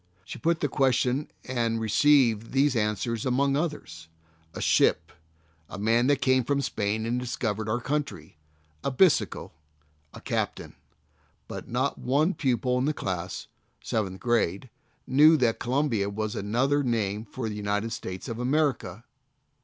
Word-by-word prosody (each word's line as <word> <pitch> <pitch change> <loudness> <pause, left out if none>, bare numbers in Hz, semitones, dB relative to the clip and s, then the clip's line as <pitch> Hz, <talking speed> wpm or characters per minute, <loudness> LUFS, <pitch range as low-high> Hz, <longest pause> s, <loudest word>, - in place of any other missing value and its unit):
She - - -8
put 165 0 0
the 145 - +2
question 130 +1 +1 0.2
and 115 -3 -1
received 115 -1 +3
these 135 0 +3
answers 110 +1 -1
among 135 +2 +1
others: 140 - -4 0.5
"A - - -5
ship." 80 +1 +2 0.6
"A - - -7
man 115 +4 +2
that 140 -1 +2
came 130 0 +4
over 125 - -3
from 140 - 0
Spain 110 -2 -1
and 120 +2 -1
discovered 110 -3 -3
our 115 +3 0
country." 125 - -4 0.4
"A - - 0
bisikkel." 155 +5 +2 0.6
"A - - -8
captain." - - -3 0.7
Bi;t - - -7
not 130 +4 -1
one 150 +8 +1
pupil 125 -3 0
in 130 - 0
the 150 +1 0
class 95 -1 -4 0.4
(seventh 95 -4 -2
grade) 120 -1 0 0.3
knew 155 +4 +6
that 120 -5 +1
Columbia 125 -6 0
was 110 +2 -3
another 125 +8 +1
name 110 -5 -1
for 120 +2 -6
United 105 +1 -2
States 95 -2 -6
of 115 -2 -5
America. 125 - 0
120 Hz, 145 wpm, -27 LUFS, 105-135 Hz, 0.7 s, knew